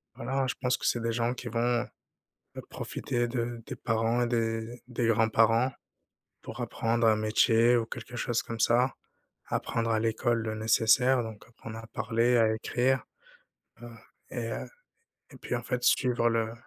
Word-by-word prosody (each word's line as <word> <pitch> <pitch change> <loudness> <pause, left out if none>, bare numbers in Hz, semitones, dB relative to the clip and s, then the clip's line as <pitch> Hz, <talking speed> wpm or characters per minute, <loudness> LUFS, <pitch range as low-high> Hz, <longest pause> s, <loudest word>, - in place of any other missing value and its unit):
voilà, 135 +3 -1
je 125 - -1
pense 125 -1 +1
que - - -6
c'est 120 - +2
des 115 - -1
gens 120 +1 0
qui 125 -1 -8
vont 120 +1 0 0.7
b - - -6
profiter 120 0 -3
de 120 -1 -3
des - - -6
parents 115 +2 0
et 120 - +1
des 115 -1 0
d 120 +2 -10
des 120 -1 -1
grands-parents 115 +2 +3 0.7
pour - - -8
apprendre 115 +1 0
un 110 -1 +5
métier 115 +2 +4
ou 115 -1 0
quelque 120 +1 -8
chose 120 -1 -1
comme 115 -1 -7
ça, 120 +3 +3 0.5
apprendre 115 0 -2
à 110 -1 +2
l'école 115 +1 0
le 110 -1 -3
nécessaire, 115 +4 +3
donc 110 -2 -8
apprendre 115 -1 -10
à 115 - -9
parler, 120 +1 +1
à 110 -1 +4
écrire, 125 +4 0 0.8
heu, 120 - -9 0.4
et 115 -2 -3
heu, - - -4 0.7
et - - -12
puis - - -4
en 120 - -4
fait, 125 +1 -3
suivre 125 -2 +3
le 115 -1 0
115 Hz, 175 wpm, -29 LUFS, 115-120 Hz, 0.8 s, un